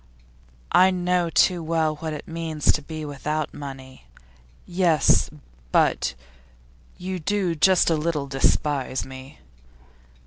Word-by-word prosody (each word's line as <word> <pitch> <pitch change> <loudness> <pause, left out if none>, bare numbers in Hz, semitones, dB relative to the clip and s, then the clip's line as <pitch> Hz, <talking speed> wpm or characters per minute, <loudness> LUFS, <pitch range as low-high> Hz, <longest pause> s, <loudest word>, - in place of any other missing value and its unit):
'I 185 +1 +6
know 180 -1 0
too 175 +1 +3
well 160 -1 0
what 160 +1 -4
it 150 - -7
means 165 -2 0
to 150 - -1
be 155 +1 -7
without 150 +1 -3
money.' 135 - -9 0.6
'Yes, 175 -5 +3 0.4
but - - +2 0.8
you 185 0 -4
do 190 +1 0
just 175 +2 +4
a - - +3
little 155 -2 -1
despise 135 0 0
me? 130 +2 -11
155 Hz, 115 wpm, -24 LUFS, 145-175 Hz, 0.8 s, I